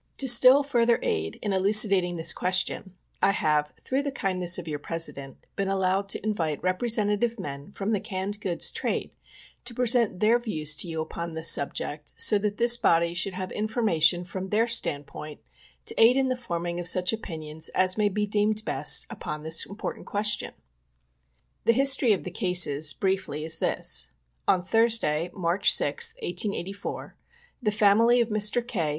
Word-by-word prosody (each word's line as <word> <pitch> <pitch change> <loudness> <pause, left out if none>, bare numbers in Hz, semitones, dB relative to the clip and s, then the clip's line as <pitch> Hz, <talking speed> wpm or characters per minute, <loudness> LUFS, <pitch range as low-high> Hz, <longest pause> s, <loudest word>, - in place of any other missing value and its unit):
To 270 - 0
still 255 +3 +6
further 235 -4 +1
aid 80 0 -3
in 205 - -2
elucidating 195 -2 +4
this 165 -1 +5
question, 185 +1 -1 0.3
I 195 - +3
have, 150 -3 0
through 265 +2 -2
the 285 0 -4
kindness 185 -8 +1
of 175 -2 -8
your 150 -2 -5
President, 145 -4 -3
been 195 - -2
allowed 195 +1 -1
to - - -3
invite 165 -9 -3
representative 215 +3 0
men 140 +4 -8
from 200 +1 -4
the 210 - 0
canned 205 0 -6
goods 175 -4 0
trade - - -3 0.5
to 235 - -1
present 235 -6 +1
their 225 +4 +3
views 155 -10 -1
to 175 - -2
you 160 -1 -4
upon 165 +1 -7
this 160 +1 +3
subject, 145 +1 -2
so 210 - +5
that 205 0 -3
this 235 0 +5
body 170 -5 +1
should 180 +2 -2
have 185 0 -6
information 180 -6 +1
from 190 +2 -7
their 220 +3 +1
standpoint 150 -8 -2 0.5
to - - 0
aid 240 +3 +5
in 265 -1 +1
the 255 - -1
forming 175 -7 -5
of 175 - -4
such 180 +3 +1
opinions 160 -7 -4
as 185 0 +2
may 210 -1 +1
be 210 +1 -2
deemed 210 +1 0
best 145 -4 +2
upon 150 0 -7
this 160 +1 +1
important 200 +2 -8
question. 210 +1 -1 1.1
The 230 - +4
history 270 -1 +3
of 200 - 0
the - - -7
cases, 170 -7 +2
briefly, 190 -3 -3
is 160 0 0
this: - - +1 0.4
On 180 -1 +1
Thursday, 220 -8 +2
March 175 0 +1
6th, 470 -1 +2
1884, 200 - -4 0.5
the 220 - 0
family 220 +3 +3
of 235 -1 0
Mr. 215 +3 +1
K. 165 -10 -2
195 Hz, 170 wpm, -25 LUFS, 170-220 Hz, 1.1 s, still